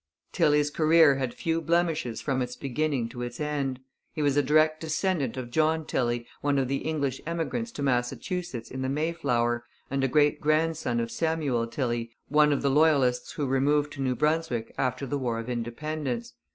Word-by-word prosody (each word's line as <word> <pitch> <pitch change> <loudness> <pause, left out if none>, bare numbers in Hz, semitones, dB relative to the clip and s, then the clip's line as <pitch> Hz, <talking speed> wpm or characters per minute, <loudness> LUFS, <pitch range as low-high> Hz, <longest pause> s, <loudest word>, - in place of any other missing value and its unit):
Tilley's 150 0 +3
career 155 -2 +5
had 130 -3 -1
few 165 +3 -1
blemishes 165 -6 0
from 135 -2 -1
its 125 0 -3
beginning 140 -2 -1
to 120 +1 -8
its 120 0 -5
end. 140 -4 -2 0.3
He 155 - -2
was 140 -1 +2
a 145 - +5
direct 155 +3 +3
descendant 155 - -1
of 120 -2 -5
John 160 +2 +2
Tilley, 120 -3 -1 0.2
one 145 -1 +1
of 135 -2 +1
the 135 +2 0
English 140 -4 -2
emigrants 170 +8 -2
to 145 - -4
Massachusetts 125 +2 -2
in 130 - -5
the 130 - -1
Mayflower, 135 -6 0 0.3
and 135 0 0
a - - +3
great 145 +2 +3
grandson 155 -5 +1
of 115 0 -2
Samuel 145 -4 0
Tilley, 120 -2 -2 0.2
one 150 0 +5
of 145 - 0
the 140 - +3
Loyalists 140 -4 +3
who 145 - -2
removed 145 +3 +1
to 140 - -6
New 130 -1 0
Brunswick 150 -7 0
after 130 +1 -1
the 140 +2 -2
War 120 -3 -1
of 115 +1 -5
Independence. 120 +1 -3
140 Hz, 180 wpm, -27 LUFS, 125-155 Hz, 0.3 s, career